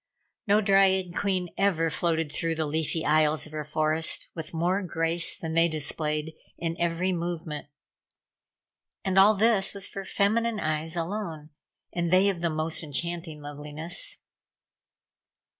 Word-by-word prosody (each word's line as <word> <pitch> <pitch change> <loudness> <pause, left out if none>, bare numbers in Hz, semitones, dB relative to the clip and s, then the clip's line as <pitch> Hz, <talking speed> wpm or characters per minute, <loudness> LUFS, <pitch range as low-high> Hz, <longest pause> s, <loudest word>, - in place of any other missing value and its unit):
No 205 +2 +5
dryad 190 -3 +3
queen 185 -3 0
ever 165 -5 +2
floated 165 -1 0
through 165 +1 -1
the 160 0 -1
leafy 160 +2 -1
aisles 155 0 +3
of 155 - -12
her 155 -1 -4
forest 155 +1 0
with 160 -2 -6
more 175 +4 +1
grace 170 -1 0
than 160 -1 -5
they 165 +1 +5
displayed 155 0 -2 0.2
in 165 -1 -2
every 170 +2 +1
movement. 170 -4 -4 1.4
And 190 0 +3
all 210 +3 +7
this 205 -2 +3
was 195 - 0
for 195 - -6
feminine 220 +3 +1
eyes 155 +1 -2
alone 165 -3 -4 0.4
and 170 -1 0
they 185 +3 +5
of 180 -4 -3
the 170 - +1
most 155 +1 -1
enchanting 160 +1 -2
loveliness. 150 - -5
165 Hz, 140 wpm, -27 LUFS, 155-190 Hz, 1.4 s, all